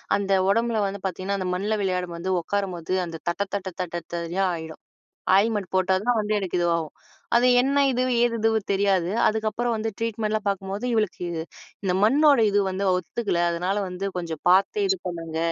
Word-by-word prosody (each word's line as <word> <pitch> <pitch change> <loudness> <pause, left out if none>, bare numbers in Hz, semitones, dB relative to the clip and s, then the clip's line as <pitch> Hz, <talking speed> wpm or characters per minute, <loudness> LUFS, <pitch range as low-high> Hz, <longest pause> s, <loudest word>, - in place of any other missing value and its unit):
அந்த 200 -1 -2 0.2
உடம்புல 230 +2 +1
வந்து 195 0 -4
பாத்தீங்கன்னா, 190 +1 -2
அந்த 185 - -3
மண்ல 200 +4 -1
விளையாடும் 180 -2 -1
போது, 170 +3 -4
உக்காரும்போது. 185 -1 -3
அந்த 165 -1 -6
தட்ட 175 +3 -1
தட்ட 195 -1 -2
தட்ட, 180 -2 -4 0.2
தடியா 170 +3 -1
ஆயிடும். 160 -1 -8 0.6
ஆயின்மென்ட் 205 -2 +1
போட்டா 185 0 +3
தான் 245 0 +2
வந்து 210 0 -2
எனக்கு 190 -2 -3
இதுவாகும். 170 -3 0 0.4
அது 245 +1 +4 0.2
என்ன 280 +1 +2
இது? 250 0 +1 0.2
ஏது 240 -1 +2
இதுவும் 220 -2 +1
தெரியாது. 195 -3 +2 0.2
அதுக்கப்புறம் 220 +2 -1
வந்து 220 +1 -2
ட்ரீட்மெண்டெலாம் 215 -2 -1
பாக்கும்போது, 195 +3 -3
இவளுக்கு 215 -4 0
இது 165 -1 -3 0.4
இந்த 180 - +1
மண்ணோட 285 +4 +5
இது 205 0 +3
வந்து 195 +1 -2
ஒத்துக்கல. 180 0 -2
அதுனால 180 +4 -1
வந்து 180 +2 -4
கொஞ்சம் 165 -3 -5
பாத்தே 195 - +3
இது 385 0 +1
பண்ணுங்க. 165 -2 -5
195 Hz, 170 wpm, -24 LUFS, 180-220 Hz, 0.6 s, மண்ணோட